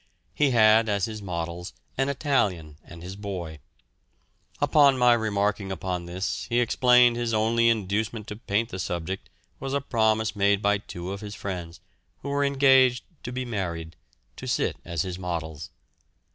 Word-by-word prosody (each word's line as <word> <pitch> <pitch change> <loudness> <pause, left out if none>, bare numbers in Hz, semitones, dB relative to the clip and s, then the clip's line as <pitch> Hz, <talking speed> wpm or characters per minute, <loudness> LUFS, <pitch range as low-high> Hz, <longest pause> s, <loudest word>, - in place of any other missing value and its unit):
He 145 -2 +2
had 110 -2 +5
as 100 -2 +1
his 110 -1 -6
models 85 -1 -5 0.2
an 135 +1 0
Italian 95 - -1
and 85 0 -12
his 90 +2 -7
boy. 90 -7 -6 1.0
Upon 140 -3 +5
my 125 -1 +5
remarking 105 -3 0
upon 90 -2 -4
this, 90 +2 -3
he 120 0 +2
explained 125 0 +4
his 120 -2 -1
only 115 +2 +3
inducement 110 0 -1
to 105 - -5
paint 110 +1 -1
the 95 - -6
subject 90 +1 -4 0.3
was 135 +1 -3
a - - +2
promise 110 -4 +1
made 100 0 +3
by 100 0 +2
two 90 -2 -7
of 100 0 -6
his 105 -1 -7
friends, 90 -3 -6 0.4
who 140 - -4
were 140 0 +1
engaged 130 -3 +4 0.2
to 125 - -6
be 130 0 -3
married, 85 -8 -4 0.4
to - - -7
sit - - 0
as 85 -2 -2
his 90 -1 -5
models. 80 -4 -5
105 Hz, 160 wpm, -26 LUFS, 90-120 Hz, 1.0 s, had